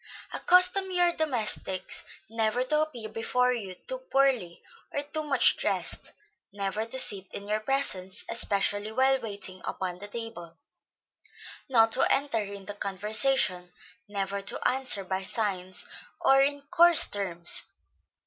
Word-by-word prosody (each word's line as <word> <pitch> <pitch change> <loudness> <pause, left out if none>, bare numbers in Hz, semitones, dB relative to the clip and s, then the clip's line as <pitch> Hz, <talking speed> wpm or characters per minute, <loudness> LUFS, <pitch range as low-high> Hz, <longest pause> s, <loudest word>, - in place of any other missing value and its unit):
Accustom 365 +2 +4
your 355 -1 +3
domestics 225 - -1 0.2
never 225 +2 0
to 300 +4 +1
appear 250 -8 -4
before 250 +3 0
you 200 -6 -6
too - - -6
poorly, 270 - 0 0.3
or 285 - -2
too 300 +2 -3
much 295 -3 +4
dressed; - - -2 0.4
never 200 +2 -3
to 260 - -4
sit 195 -7 +1
in 200 - -6
your 215 +1 0
presence, 215 -7 0
especially 205 -1 +2
while 265 +3 +2
waiting 200 -4 -6
upon 180 -1 -4
the 205 - -7
table; 205 -7 -7 1.1
not 225 -3 +4
to 260 - +4
enter 275 -5 +1
into 200 0 -7
conversation; 200 -1 0 0.4
never 200 -1 -3
to 195 - -2
answer 255 -6 +1
by 190 0 -3
signs, 190 -3 -3 0.3
or 270 0 +5
in 285 +1 +1
coarse 345 -1 +5
terms. 175 -4 -1
220 Hz, 130 wpm, -28 LUFS, 195-270 Hz, 1.1 s, or